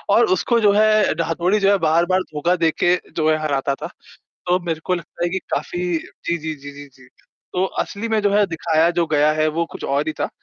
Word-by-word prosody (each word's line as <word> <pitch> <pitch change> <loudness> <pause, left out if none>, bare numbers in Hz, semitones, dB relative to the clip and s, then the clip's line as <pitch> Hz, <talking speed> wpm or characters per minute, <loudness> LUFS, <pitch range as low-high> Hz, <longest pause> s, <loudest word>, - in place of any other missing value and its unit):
और 235 - +5
उसको 235 +4 +1
जो 205 -2 +4
है, 215 -2 +4
ढ़ा 165 +1 -2
हतोड़ी 175 +5 +1
जो 195 0 +3
है 200 - +4
बार-बार 175 +4 +2
धोखा 170 +5 +1
देके 175 +2 +2 0.2
जो 155 0 +2
है 155 - +3
हराता 140 -2 -1
था। - - -6 0.6
तो 180 +1 +3
मेरे 165 -2 -2
को 180 - +1
लगता 175 0 -7
है 175 - +1
कि 190 +2 -2
काफ़ी 175 - -3 0.2
जी, 170 +2 -5
जी, 160 0 -4
जी, 145 0 -10
जी, 145 0 -11
जी। 130 -1 -20 0.5
तो 185 +1 +1 0.2
असली 215 +3 -6
में 220 -1 +1
जो 205 -1 +1
है 205 0 +4
दिखाया 165 -1 +1
जो 170 - +3
गया 150 0 +3
है 155 0 +1
वो 170 - +1
कुछ - - -9
और 140 +3 -1
ही 155 - -1
था। - - -1
170 Hz, 235 wpm, -20 LUFS, 155-190 Hz, 0.6 s, और